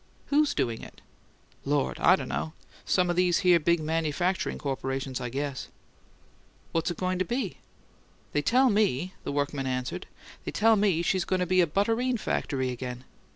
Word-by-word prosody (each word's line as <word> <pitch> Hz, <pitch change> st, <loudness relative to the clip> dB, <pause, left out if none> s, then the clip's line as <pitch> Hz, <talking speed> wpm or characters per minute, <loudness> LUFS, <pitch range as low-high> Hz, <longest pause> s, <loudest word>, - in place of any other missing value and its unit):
"Who's 295 Hz, +1 st, +3 dB
doing 115 Hz, -2 st, -1 dB
it?" -, -, -12 dB, 0.6 s
"Lord! 145 Hz, 0 st, 0 dB
I 180 Hz, -, +6 dB
d' -, -, -5 dB
know. 155 Hz, -, -3 dB, 0.3 s
Some 180 Hz, -2 st, +2 dB
o' -, -, +1 dB
these 180 Hz, 0 st, +2 dB
here 175 Hz, -2 st, +6 dB
big 170 Hz, +2 st, +2 dB
manufacturing 165 Hz, +3 st, -1 dB
corporations, 135 Hz, -1 st, -3 dB
I 125 Hz, -, -3 dB
guess." 140 Hz, +1 st, -3 dB, 1.0 s
"What's 165 Hz, +1 st, 0 dB
it 175 Hz, -, -4 dB
going 185 Hz, 0 st, -1 dB
to 185 Hz, -, +1 dB
be?" 215 Hz, -10 st, -3 dB, 0.8 s
"They 145 Hz, -, +2 dB
tell 255 Hz, -, +4 dB
ME," 190 Hz, -4 st, +1 dB
the -, -, -3 dB
workman 140 Hz, -1 st, -1 dB
answered 125 Hz, -1 st, -3 dB, 0.4 s
"they -, -, -4 dB
tell 225 Hz, +1 st, +4 dB
ME 195 Hz, -5 st, +2 dB
she's 185 Hz, +1 st, +1 dB
goin' 185 Hz, 0 st, 0 dB
to 180 Hz, -, +1 dB
be 185 Hz, +1 st, +4 dB
a 170 Hz, -, +3 dB
butterine 225 Hz, +9 st, +1 dB
factory 130 Hz, -, -1 dB
again. 125 Hz, 0 st, -6 dB
170 Hz, 170 wpm, -28 LUFS, 140-190 Hz, 1.0 s, I